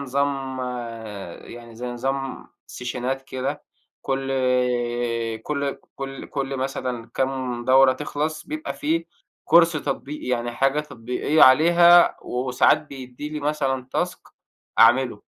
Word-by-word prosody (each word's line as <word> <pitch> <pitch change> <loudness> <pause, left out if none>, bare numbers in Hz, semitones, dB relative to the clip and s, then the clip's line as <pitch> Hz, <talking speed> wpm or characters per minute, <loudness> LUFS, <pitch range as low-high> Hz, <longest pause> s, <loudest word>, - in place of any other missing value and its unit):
نظام 135 -1 -2 0.9
يعني 115 -1 -11
زي 125 +2 -5
نظام 135 +2 -3 0.2
سيشنات 125 +2 -4
كده 130 0 -4 0.4
كلّ 135 0 -2 1.1
كلّ 140 0 -2 0.2
كلّ 135 0 -6
كلّ 135 -1 -3
مثلًا 130 -3 -4
كام 130 -2 -2
دورة 130 +1 +6
تخلَص 150 +3 -4
بيبقى 310 +1 -5
في 315 +3 -1 0.4
كورس 170 0 +6
تطبيقي 145 -1 -4
يعني 120 -1 -1
حاجة 135 +4 +1
تطبيقية 125 +2 0
عليها، 170 +5 +7
وساعات 125 0 +2
بيدّي 135 0 -8
لي 150 0 -5
مثلًا 135 -3 -1
task - - -1 0.6
أعملُه. 120 +3 +4
135 Hz, 110 wpm, -23 LUFS, 125-145 Hz, 1.1 s, عليها